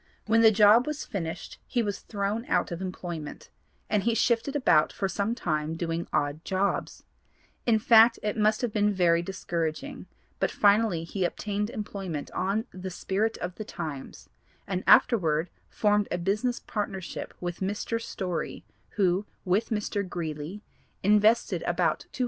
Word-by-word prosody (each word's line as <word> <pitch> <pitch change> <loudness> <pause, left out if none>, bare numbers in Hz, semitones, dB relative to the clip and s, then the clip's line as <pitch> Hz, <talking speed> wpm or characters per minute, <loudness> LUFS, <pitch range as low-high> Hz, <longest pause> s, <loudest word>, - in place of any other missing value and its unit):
When 225 +1 +4
the 225 - +8
job 220 +4 +6
was 300 -1 -3
finished 165 -5 -5
he 240 -2 0
was 205 -2 -3
thrown 205 +2 -3
out 175 - +1
of 170 +1 -4
employment, 175 -4 -6 0.4
and 210 - +1
he 230 +2 +1
shifted 235 +5 +1
about 250 - +4
for 195 - -2
some 205 +4 -1
time 155 -5 -2
doing 165 0 -3
odd 145 +2 -1
jobs; 195 +1 -1 0.6
in 230 -2 +5
fact 225 +1 +6
it 210 -1 -1
must 215 0 +2
have 235 -4 -1
been 210 -1 +2
very 170 -3 +3
discouraging, 175 - -4 0.3
but - - +1
finally 205 -4 +3
he 185 +3 -3
obtained 205 +4 -2
employment 195 -9 -5
on 200 +5 -1
the 185 0 -6
Spirit 200 +5 -1
of 180 +1 -4
the 215 - -4
Times, 145 -8 -7 0.4
and 185 -1 -3
afterward 165 -7 +4 0.2
formed 210 -1 +2
a - - -1
business 210 +8 0
partnership 195 -4 -5
with 175 -1 -4
Mr. 205 +4 -2
Story 185 -6 -4 0.3
who, 190 0 +2 0.2
with 190 +4 +1
Mr. 210 -2 -1
Greeley, 170 +1 -5 0.4
invested 210 +3 +3
about - - 0
$240. - - -11
200 Hz, 150 wpm, -27 LUFS, 175-220 Hz, 0.6 s, the